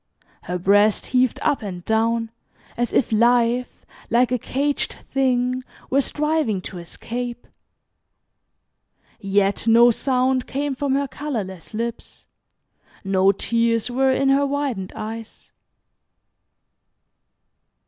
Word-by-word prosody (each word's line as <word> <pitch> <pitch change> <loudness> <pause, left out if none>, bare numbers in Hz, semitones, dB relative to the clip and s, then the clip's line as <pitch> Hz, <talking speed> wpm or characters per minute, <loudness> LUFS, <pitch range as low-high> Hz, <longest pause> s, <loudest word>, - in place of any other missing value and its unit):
Her 180 - -2
breast 205 +3 +3
heaved 255 -1 +1
up 285 - +1
and 180 -4 -7
down, 225 +1 +1 0.4
as 240 0 -1
if - - +1
life, 240 +2 +2 0.2
like 240 +1 +3
a 250 - +1
caged 280 +5 -1 0.2
thing, 255 -1 +1 0.3
were 275 +2 +4
striving 300 -8 0
to 180 - -7
escape. 240 +7 -6 1.7
Yet 195 +2 0
no 235 +1 +7
sound 255 +1 +1
came 280 +1 -2
from 270 0 -1
her 280 0 0
colorless 215 - -5
lips, 235 +1 -5 0.8
no 195 0 +3
tears 230 +3 0
were 265 +2 +2
in 270 +1 +2
her 275 +1 +4
widened 275 -10 -2
eyes. 220 +1 -8
240 Hz, 105 wpm, -22 LUFS, 215-265 Hz, 1.7 s, no